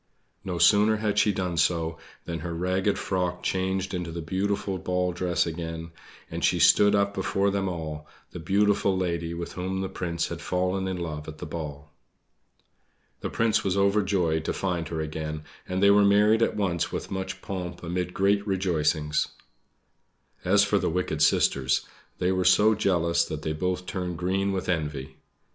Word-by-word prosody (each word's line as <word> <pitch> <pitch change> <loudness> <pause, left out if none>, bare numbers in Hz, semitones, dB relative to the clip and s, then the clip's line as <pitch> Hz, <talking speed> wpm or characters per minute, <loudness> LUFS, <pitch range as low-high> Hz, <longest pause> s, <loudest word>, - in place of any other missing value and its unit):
No 90 -2 -3
sooner 105 +4 +5
had 105 -1 0
she 105 - +4
done 90 -3 -2
so 80 -1 +1 0.3
than 85 -1 -4
her 85 -1 -5
ragged 95 +3 0
frock 90 -2 -2
changed 95 0 -1
into 90 -2 -3
the 85 - -5
beautiful 95 +2 -1
ball 90 0 0
dress 90 0 0
again, 80 0 -5 0.4
and - - -4
she - - +3
stood 105 0 +5
up 100 0 +1
before 100 0 0
them 95 -1 -1
all 80 -3 -5 0.2
the 90 - -7
beautiful 100 +2 +2
lady 85 -2 -2
with 85 0 -5
whom 95 +1 -3
the 95 - -3
Prince 85 -2 -3
had - - -6
fallen 90 +1 -1
in 95 -1 -2
love 80 -3 -5
at 80 0 -8
the - - -6
ball. 75 -2 -7 1.3
The - - -4
Prince 115 -1 +1
was 95 0 0
overjoyed 100 -5 +2
to - - -1
find 90 -4 -2
her 80 -1 -3
again; 75 0 -4 0.3
and 95 +1 0
they 100 - +7
were 100 0 +6
married 105 +3 +4
at 115 - +1
once 90 -4 0
with - - -5
much 95 -1 -4
pomp 90 -3 -5
amid 90 +1 -2
great 100 +2 +1
rejoicings. 80 -5 +1 1.2
As - - +4
for - - +2
the - - 0
wicked 80 -3 -2
sisters 70 -3 +3 0.3
they 90 +1 +1
were 95 -1 +1
so 105 +4 +5
jealous 85 -5 +2
that 80 -1 -6
they 80 - -1
both 90 +3 -2
turned 90 -2 -4
green 95 +3 0
with 95 -1 -3
envy. 75 -6 -3
90 Hz, 175 wpm, -26 LUFS, 85-95 Hz, 1.3 s, they